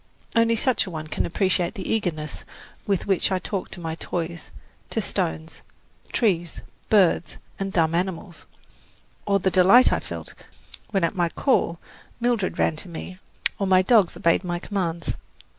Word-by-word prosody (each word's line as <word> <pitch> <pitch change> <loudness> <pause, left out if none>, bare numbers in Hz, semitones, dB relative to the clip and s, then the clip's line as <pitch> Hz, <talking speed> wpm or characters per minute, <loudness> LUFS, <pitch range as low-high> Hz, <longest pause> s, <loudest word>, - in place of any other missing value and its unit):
Only 230 0 +4
such 230 -2 +1
a - - -4
one 155 -3 -5
can 155 - -2
appreciate 185 +1 0
the 195 - -5
eagerness 155 -9 -2 0.4
with 200 -3 0
which 195 0 +2
I 190 - +2
talked 190 +1 -4
to - - -8
my 165 -2 -3
toys, 170 0 -5 0.4
to - - 0
stones, 80 0 -3 0.5
trees, 175 -7 0 0.3
birds 190 -5 +3 0.2
and 195 0 -2
dumb 165 -3 +2
animals, 175 -1 -3 0.8
or 200 -1 +4
the 190 0 0
delight 195 +8 +6
I - - +1
felt - - -7 0.6
when 195 -4 0
at 170 - +1
my 175 -3 +1
call 170 - +1 0.4
Mildred 235 -5 0
ran 160 - +2
to 180 - -6
me 180 +2 -8 0.4
or 195 - 0
my 185 0 +5
dogs 210 -4 +4
obeyed 170 +3 +2
my 175 -1 -2
commands. 175 -3 -3
185 Hz, 160 wpm, -24 LUFS, 170-200 Hz, 0.8 s, delight